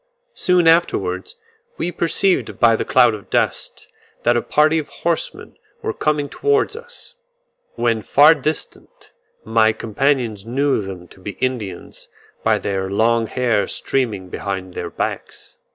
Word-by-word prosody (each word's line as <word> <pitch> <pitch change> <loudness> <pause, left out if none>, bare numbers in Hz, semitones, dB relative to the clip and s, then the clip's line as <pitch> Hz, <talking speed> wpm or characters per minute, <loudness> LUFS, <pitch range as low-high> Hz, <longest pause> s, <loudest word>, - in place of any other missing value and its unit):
Soon 180 -2 +2
afterwards 175 - +1 0.4
we 175 - -2
perceived 175 +3 +1
by 115 -1 +5
the - - -1
cloud 120 -3 +4
of 105 -2 -9
dust, - - -1 0.4
that 120 +1 +3
a 120 - +2
party 155 +2 +3
of 150 - -6
horsemen 170 -1 -3 0.3
were - - -2
coming 150 -1 0
towards 425 - +1
us; 485 +1 -9 0.6
when 115 -2 +1
far 145 +8 +6
distant 155 -1 -6 0.3
my 110 0 +3
companions 115 -1 -1
knew 135 +2 0
them 95 -3 -8
to - - -17
be 100 +2 -6
Indians, 115 -8 -4 0.4
by - - +3
their 95 -1 -2
long 115 +3 +2
hair 115 -5 0
streaming 105 -9 -2
behind 95 -1 -5
their 85 - -5
backs. - - -5
120 Hz, 135 wpm, -20 LUFS, 105-155 Hz, 0.6 s, far